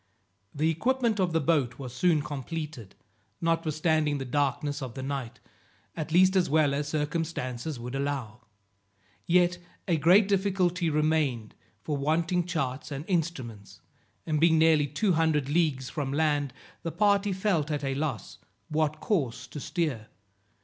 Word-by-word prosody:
The 155 Hz, +3 st, +1 dB
equipment 235 Hz, -, 0 dB
of 180 Hz, -2 st, +2 dB
the 165 Hz, -, +2 dB
boat 140 Hz, -5 st, +1 dB
was 125 Hz, -3 st, -7 dB
soon 155 Hz, +2 st, +2 dB
completed, 145 Hz, -, -6 dB, 0.4 s
notwithstanding 155 Hz, -2 st, +1 dB
the 135 Hz, -, -4 dB
darkness 145 Hz, +2 st, -1 dB
of 130 Hz, -2 st, -6 dB
the 130 Hz, -, -5 dB
night, 135 Hz, -4 st, -4 dB, 0.6 s
at 160 Hz, 0 st, -4 dB
least 185 Hz, +3 st, +5 dB
as 185 Hz, -2 st, +3 dB
well 150 Hz, -1 st, +3 dB
as 145 Hz, +1 st, -1 dB
circumstances 150 Hz, -3 st, -3 dB
would 125 Hz, +2 st, -6 dB
allow. 135 Hz, -5 st, -3 dB, 0.9 s
Yet 175 Hz, 0 st, +3 dB, 0.3 s
a 170 Hz, -3 st, +2 dB
great 180 Hz, +7 st, +5 dB
difficulty 185 Hz, -3 st, +1 dB
remained, 150 Hz, -7 st, 0 dB, 0.3 s
for 150 Hz, -2 st, -2 dB
wanting 165 Hz, +5 st, 0 dB
charts 140 Hz, -7 st, -2 dB
and 140 Hz, +2 st, -5 dB
instruments, 135 Hz, -, -3 dB, 0.4 s
and 155 Hz, -2 st, 0 dB
being 165 Hz, -1 st, +5 dB
nearly 160 Hz, -2 st, +4 dB
two 185 Hz, +7 st, +1 dB
hundred 155 Hz, -4 st, +1 dB
leagues 145 Hz, -5 st, +1 dB
from 140 Hz, -3 st, -3 dB
land, 145 Hz, -2 st, +1 dB, 0.3 s
the 165 Hz, -, -4 dB
party 205 Hz, 0 st, +2 dB
felt 185 Hz, -6 st, 0 dB
at 150 Hz, -1 st, -2 dB
a 135 Hz, -1 st, -1 dB
loss 135 Hz, -7 st, -4 dB, 0.3 s
what 155 Hz, 0 st, 0 dB
course 130 Hz, -, -1 dB
to 140 Hz, +4 st, -8 dB
steer. 140 Hz, -, -2 dB
155 Hz, 145 wpm, -28 LUFS, 140-170 Hz, 0.9 s, least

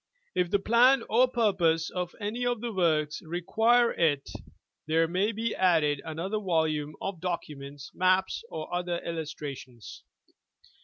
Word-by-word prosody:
If 180 Hz, -1 st, +1 dB
the 200 Hz, -, +3 dB
plan 235 Hz, +5 st, +4 dB
or 245 Hz, +4 st, +5 dB
purpose 190 Hz, -10 st, +1 dB
of 180 Hz, -1 st, -4 dB
any 220 Hz, +4 st, -3 dB
of 245 Hz, -1 st, 0 dB
the 235 Hz, 0 st, -4 dB
works 155 Hz, -5 st, +1 dB
require 225 Hz, +8 st, +2 dB
il, 155 Hz, -4 st, +2 dB, 0.7 s
there 165 Hz, +1 st, +3 dB
may 185 Hz, +6 st, 0 dB
be 225 Hz, +1 st, -2 dB
added 160 Hz, -6 st, +2 dB
another 170 Hz, +7 st, -3 dB
volume 160 Hz, -5 st, 0 dB
of 195 Hz, -3 st, -4 dB
documents, 145 Hz, -5 st, -5 dB
maps, 185 Hz, +1 st, +1 dB
or 155 Hz, +1 st, -6 dB
other 175 Hz, -1 st, -1 dB
illustrations. 145 Hz, -7 st, -7 dB
175 Hz, 135 wpm, -28 LUFS, 155-210 Hz, 0.7 s, or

